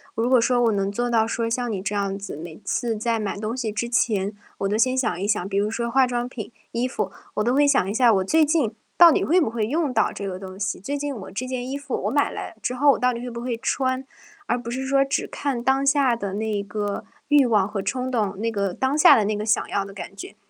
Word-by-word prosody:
如 230 Hz, +2 st, 0 dB
果 255 Hz, -1 st, +6 dB
说 245 Hz, +1 st, +2 dB
我 235 Hz, -2 st, +3 dB
能 195 Hz, -1 st, 0 dB
做 240 Hz, +4 st, -2 dB
到 225 Hz, -2 st, +2 dB
说 230 Hz, 0 st, -1 dB
像 245 Hz, +1 st, -1 dB
你 200 Hz, -4 st, -3 dB
这 195 Hz, +1 st, -3 dB
样 200 Hz, -1 st, -1 dB
子， 195 Hz, -7 st, -7 dB
每 160 Hz, 0 st, -8 dB
次 230 Hz, +3 st, -1 dB
在 225 Hz, +1 st, -1 dB
买 210 Hz, -2 st, -2 dB
东 220 Hz, +4 st, -3 dB
西 225 Hz, -5 st, -2 dB
之 235 Hz, +3 st, -2 dB
前 205 Hz, -5 st, +1 dB, 0.3 s
我 195 Hz, -, 0 dB
都 210 Hz, -, +1 dB
先 255 Hz, +3 st, +2 dB
想 240 Hz, -8 st, 0 dB
一 200 Hz, -, -1 dB
想。 205 Hz, -3 st, 0 dB
比 195 Hz, -, -1 dB
如 205 Hz, +1 st, +1 dB
说 235 Hz, +1 st, -2 dB
化 265 Hz, +1 st, +4 dB
妆 245 Hz, 0 st, -2 dB
品、 220 Hz, -5 st, -7 dB, 0.2 s
衣 240 Hz, +2 st, 0 dB
服， 210 Hz, -6 st, -3 dB, 0.2 s
我 210 Hz, -, 0 dB
都 240 Hz, +3 st, +1 dB
会 290 Hz, +2 st, +4 dB
想 270 Hz, -9 st, +3 dB
一 -, -, -2 dB
下 235 Hz, 0 st, +5 dB
我 190 Hz, -2 st, +2 dB
最 310 Hz, +11 st, +3 dB
近 290 Hz, -7 st, +1 dB, 0.2 s
到 345 Hz, -1 st, +9 dB
底 -, -, +1 dB
会 355 Hz, +4 st, +4 dB
不 265 Hz, -, +1 dB
会 225 Hz, -2 st, -1 dB
用 295 Hz, +1 st, 0 dB
到 220 Hz, -, +2 dB
这 200 Hz, -, -6 dB
个 185 Hz, -1 st, -4 dB
东 190 Hz, -1 st, -9 dB
西。 200 Hz, +1 st, -2 dB
最 280 Hz, +9 st, -3 dB
近 290 Hz, 0 st, -3 dB
我 210 Hz, -7 st, -8 dB
这 220 Hz, +7 st, -4 dB
件 255 Hz, 0 st, -4 dB
衣 275 Hz, -, -3 dB
服 285 Hz, -2 st, -4 dB
我 -, -, 0 dB
买 285 Hz, +1 st, +2 dB
来 -, -, -7 dB
之 250 Hz, -, -1 dB
后 285 Hz, +3 st, +5 dB
我 -, -, +1 dB
到 250 Hz, 0 st, +3 dB
底 235 Hz, -, -5 dB
会 245 Hz, +1 st, -5 dB
不 235 Hz, 0 st, -6 dB
会 240 Hz, -1 st, -2 dB
穿， 260 Hz, +2 st, -1 dB, 0.4 s
而 245 Hz, -, 0 dB
不 235 Hz, -1 st, -6 dB
是 260 Hz, +2 st, -3 dB
说 275 Hz, +1 st, +3 dB
只 275 Hz, -, -1 dB
看 270 Hz, -4 st, -3 dB
当 265 Hz, +2 st, +2 dB
下 275 Hz, -3 st, +3 dB
的 200 Hz, -4 st, -4 dB
那 210 Hz, -1 st, -2 dB
个 205 Hz, 0 st, -3 dB, 0.2 s
欲 290 Hz, -2 st, +5 dB
望 210 Hz, -5 st, +3 dB
和 205 Hz, -1 st, -3 dB
冲 255 Hz, +6 st, -2 dB
动， 210 Hz, -6 st, -1 dB
那 230 Hz, +2 st, 0 dB
个 200 Hz, -4 st, -1 dB
当 265 Hz, +8 st, 0 dB
下 305 Hz, -, +8 dB
的 215 Hz, -, +2 dB
那 210 Hz, +1 st, 0 dB
个 210 Hz, +1 st, -3 dB
想 215 Hz, -, +1 dB
要 200 Hz, -, -1 dB
的 195 Hz, -, -9 dB
感 195 Hz, 0 st, -8 dB
觉。 195 Hz, -, -9 dB
235 Hz, 300 characters per minute, -23 LUFS, 205-260 Hz, 0.4 s, 到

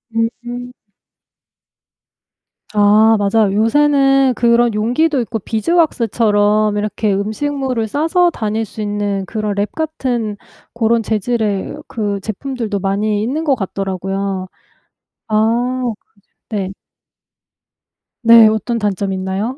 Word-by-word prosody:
음. 240 Hz, +2 st, -3 dB, 2.0 s
아 210 Hz, +2 st, +5 dB
맞아요. 205 Hz, 0 st, +2 dB
요새는 270 Hz, +3 st, +3 dB
그런 235 Hz, 0 st, +3 dB
용기도 250 Hz, +7 st, +1 dB
있고 225 Hz, -1 st, -4 dB
비즈왁스처럼 215 Hz, -, +1 dB
이렇게 210 Hz, 0 st, -1 dB
음식물을 235 Hz, +3 st, -2 dB
싸서 330 Hz, -, +2 dB
다닐 220 Hz, -2 st, -2 dB
수 215 Hz, +1 st, -9 dB
있는 205 Hz, -2 st, -2 dB
그런 215 Hz, 0 st, -3 dB
랩 205 Hz, +1 st, -1 dB
같은 250 Hz, -9 st, -2 dB, 0.4 s
그런 230 Hz, 0 st, +1 dB
재질의 215 Hz, -2 st, -1 dB
그 205 Hz, -3 st, -3 dB
제품들도 220 Hz, 0 st, -4 dB
많이 205 Hz, +2 st, 0 dB
있는 300 Hz, +7 st, -2 dB
거 280 Hz, -4 st, +3 dB
같더라고요. 195 Hz, -1 st, -3 dB, 0.8 s
아 235 Hz, +4 st, +1 dB
그죠 235 Hz, -3 st, -2 dB, 0.5 s
네. 195 Hz, -3 st, -3 dB, 1.5 s
네, 230 Hz, -1 st, +8 dB
어떤 220 Hz, +2 st, 0 dB
단점이 200 Hz, -2 st, -1 dB
있나요? 190 Hz, +6 st, -3 dB
220 Hz, 225 characters per minute, -17 LUFS, 205-245 Hz, 2.0 s, 네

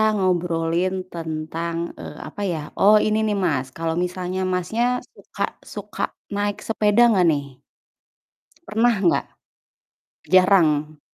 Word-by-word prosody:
ngobrolin 175 Hz, -2 st, 0 dB, 0.2 s
tentang, 165 Hz, 0 st, -4 dB, 0.2 s
eee, -, -, -8 dB
apa 205 Hz, -, -8 dB
ya. 165 Hz, -, -2 dB, 0.2 s
Oh 210 Hz, +2 st, +7 dB
ini 215 Hz, 0 st, +1 dB
nih 210 Hz, -, 0 dB
Mas, 140 Hz, -6 st, 0 dB
kalo 165 Hz, 0 st, -1 dB
misalnya 180 Hz, +1 st, -3 dB
Masnya 180 Hz, +6 st, -1 dB, 0.3 s
suka -, -, -6 dB, 0.3 s
suka -, -, -7 dB, 0.3 s
naik 205 Hz, 0 st, -1 dB
sepeda 215 Hz, 0 st, +2 dB, 0.2 s
gak 180 Hz, -, +4 dB
nih? 140 Hz, -3 st, -4 dB, 1.1 s
Pernah 230 Hz, +2 st, +2 dB
gak? 170 Hz, -, +3 dB, 1.1 s
Jarang? 160 Hz, -5 st, +4 dB
180 Hz, 115 wpm, -22 LUFS, 165-205 Hz, 1.1 s, Oh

